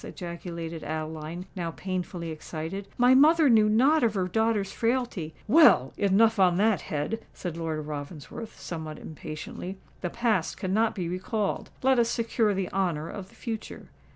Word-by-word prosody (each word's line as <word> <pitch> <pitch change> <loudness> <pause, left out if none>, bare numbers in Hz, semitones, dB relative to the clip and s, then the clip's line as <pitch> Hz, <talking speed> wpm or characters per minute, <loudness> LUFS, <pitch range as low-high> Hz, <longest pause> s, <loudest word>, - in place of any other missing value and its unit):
ejaculated 170 -2 -6
Adeline, 155 +2 -5
now 175 -3 -2
painfully 180 -1 -4
excited. 160 +5 -6
"My 245 +1 +6
mother 300 +1 +6
knew 215 -2 +5
not 270 +9 +4
of 220 -2 +2
her 185 -2 0
daughter's 220 -1 +1
frailty——" 230 -9 -1
"Well—enough 215 - +5
on 180 -2 +5
that 210 0 +3
head!" 155 +10 -3
said 175 -3 -5
Lord 160 -2 -3
Ravensworth, 150 +8 -7
somewhat 160 -3 -6
impatiently. 160 +4 -7 0.2
"The 175 - -2
past 220 -5 0
cannot 210 +3 +1
be 180 -4 -2
recalled: 195 +4 -2
let 265 -1 +4
us 230 -1 +3
secure 225 -3 +1
the 190 -1 -2
honour 170 -5 -1
of 195 -2 -7
the - - -20
future. 225 -3 -6
190 Hz, 150 wpm, -27 LUFS, 165-225 Hz, 0.2 s, My